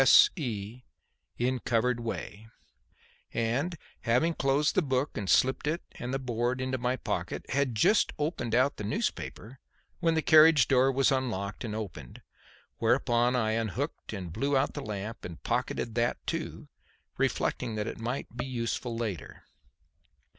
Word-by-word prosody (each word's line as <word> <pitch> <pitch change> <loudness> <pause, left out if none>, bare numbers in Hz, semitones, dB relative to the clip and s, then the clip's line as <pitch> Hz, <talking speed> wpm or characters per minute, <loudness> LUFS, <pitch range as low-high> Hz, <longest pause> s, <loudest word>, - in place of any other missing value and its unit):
S.E. 115 - +4 0.6
In 125 +1 0
covered 120 +1 +1
way"), 110 -2 -5 0.9
and 130 +10 0 0.2
having 125 +8 +2
closed 140 +1 +2
the - - +3
book 135 -1 -1
and 100 -4 -3
slipped 130 +3 +3
it 165 +4 -1
and 125 - -6
the 135 - 0
board 125 -1 -1
into 130 0 -2
my 125 +1 0
pocket, - - -3
had 135 -3 0
just 205 - +4
opened 145 -7 -1
out 130 +3 +3
the - - -5
newspaper 110 +3 -3 0.4
when 165 -2 +2
the 160 - +1
carriage 155 -5 +7
door 135 0 +4
was 135 +1 +3
unlocked 110 -7 -2
and 110 -3 -4
opened, 85 - -7 0.6
whereupon 120 +1 +2
I 110 -3 +1
unhooked 115 - -3
and 90 -6 -6
blew 140 +5 +1
out 135 - +1
the 145 - -5
lamp 105 -1 -5
and 85 -2 -8
pocketed 115 - -1
that 120 +1 +1
too, - - -4 0.5
reflecting 115 - 0
that 105 -1 -2
it - - -5
might 120 +1 -4
be 125 +2 -3
useful 120 -1 -2
later. 105 -10 -5
125 Hz, 150 wpm, -29 LUFS, 110-135 Hz, 0.9 s, carriage